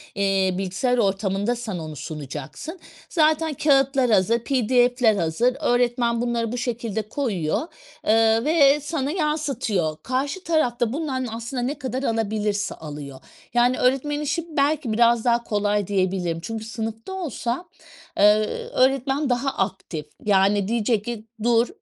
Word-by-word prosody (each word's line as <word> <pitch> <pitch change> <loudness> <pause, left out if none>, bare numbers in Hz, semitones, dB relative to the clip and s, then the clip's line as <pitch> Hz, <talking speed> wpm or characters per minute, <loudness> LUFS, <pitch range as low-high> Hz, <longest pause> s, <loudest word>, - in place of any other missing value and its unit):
eee, 195 -2 +1
bilgisayar 195 +7 0
ortamında 200 +2 0
sen 225 -6 -5
onu 155 -2 -6
sunacaksın, 150 - -7 0.3
zaten 315 -1 +2
kâğıtlar 270 -3 +3
hazır, 220 +4 +3
PDF'ler 245 -3 +3
hazır, 195 +9 +1
öğretmen 240 -1 +1
bunları 235 -2 -1
bu 245 - -3
şekilde 230 -3 -2
koyuyor. 200 - -1 0.5
Iıı, 225 +2 +4
ve 295 -2 +5
sana 290 -1 -2
yansıtıyor, 275 - -1
karşı 280 +9 -2
taraf 315 -5 +2
da 240 0 +1
bundan 265 -5 -2
aslında 235 +2 -4
ne 275 +5 -2
kadar 260 0 -3
alabilirse 210 -3 -1
alıyor. 145 -3 -8 0.3
Yani 245 +1 +3
öğretmenin 280 +4 +1
işi 300 +3 -1
belki 280 -4 +1
biraz 235 0 +3
daha 235 -1 +3
kolay 205 -2 0
diyebilirim. 185 -4 0
Çünkü 220 +4 -5
sınıfta 225 - -5
olsa, 330 -4 -3 0.5
eee, 210 +1 +7 0.4
öğretmen 270 +2 +2
daha 250 +2 +1
aktif. 190 - -3 0.2
Yani 200 0 +3
diyecek 225 -2 0
ki, 235 -3 -5 0.2
"dur, 235 0 +3
235 Hz, 130 wpm, -23 LUFS, 205-270 Hz, 0.5 s, eee